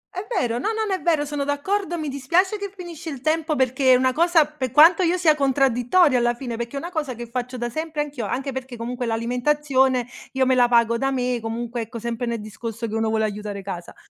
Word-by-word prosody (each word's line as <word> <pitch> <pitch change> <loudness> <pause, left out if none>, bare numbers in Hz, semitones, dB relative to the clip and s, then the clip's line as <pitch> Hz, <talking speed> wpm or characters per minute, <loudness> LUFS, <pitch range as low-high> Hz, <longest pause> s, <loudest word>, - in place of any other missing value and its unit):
È 375 +3 -5
vero, 240 -3 -1
no, - - -2
no, 440 - -1
no 390 - -1
è 375 - -2
vero, 315 -4 +1
sono 290 -1 -3
d'accordo, 345 +6 -1
mi 310 -2 -4
dispiace 335 +10 +1
che 400 -1 -5
finisce 340 -2 -8
il 275 - -6
tempo 310 0 0
perché 260 0 +3
è - - +7
una 255 0 +2
cosa 335 -1 +4
per 285 -4 -5
quanto 320 +8 +6
io 355 +1 +2
sia 330 -3 +4
contraddittoria 270 +1 +3
alla 240 0 +1
fine, 240 -2 -5
perché 235 +3 -5
è - - -2
una 345 +4 -7
cosa 295 -7 -3
che 240 - -7
faccio 250 0 -4
da 240 0 -2
sempre 315 +1 -3
anch'io, 280 -8 -4
anche 270 +5 -3
perché 260 -2 -6
comunque 245 +1 -4
l'alimentazione 255 +2 +1 0.3
io 265 0 +2
me 260 - +3
la 245 -1 +5
pago 235 -1 +3
da 270 - +1
me, 250 -2 -1
comunque 235 +1 -4
ecco 230 +2 -7
sempre 235 +1 -3
nel 235 0 -1
discorso 225 +2 -6
che 215 - -7
uno 225 0 0
vuole 220 0 +1
aiutare 205 -1 -4
casa. 180 -3 -7
260 Hz, 235 wpm, -23 LUFS, 235-305 Hz, 0.3 s, è